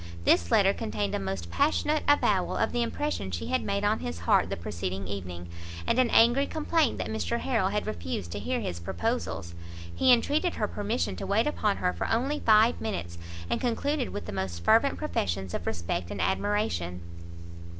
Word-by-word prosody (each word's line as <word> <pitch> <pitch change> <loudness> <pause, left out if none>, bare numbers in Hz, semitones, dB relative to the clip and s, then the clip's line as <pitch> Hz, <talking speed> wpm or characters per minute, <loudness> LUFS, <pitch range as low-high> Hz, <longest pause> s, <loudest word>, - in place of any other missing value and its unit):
This 85 -1 +4
letter 195 - +4
contained 105 - -3
a - - 0
most 95 -3 -4
passionate 300 +1 +2
avowal 290 - +3
of - - +1
the 240 - 0
impression 235 - -2
she 85 -4 -4
had 85 - +1
made 200 0 -1
on 210 +1 +2
his 80 +1 -5
heart 85 - +3
the - - -3
preceding 90 +3 -4
evening, 90 -3 -6 0.4
and 250 - +2
an 255 -2 +4
angry 240 +6 +5
complaint 315 -3 +1
that - - -2
Mr 110 -6 -1
Harrel - - +1
had - - -1
refused 85 +1 -4
to - - -4
hear - - -2
his 85 - -4
proposals. 100 - -3 0.4
He 260 - +4
entreated 295 +8 +2
her 210 - 0
permission 210 +5 -2
to - - -5
wait 205 +3 +2
upon 215 -9 0
her 180 - 0
for - - -3
only 270 +6 0
five 220 +1 +4
minutes, 85 - -4 0.3
and - - -1
concluded 265 +3 0
with 205 - -6
the - - -6
most 95 -3 -4
fervent 230 +5 +4
professions 95 - -2
of 85 - -4
respect 85 0 -2
and 100 - -5
admiration. 90 - -1
195 Hz, 185 wpm, -28 LUFS, -, 0.4 s, angry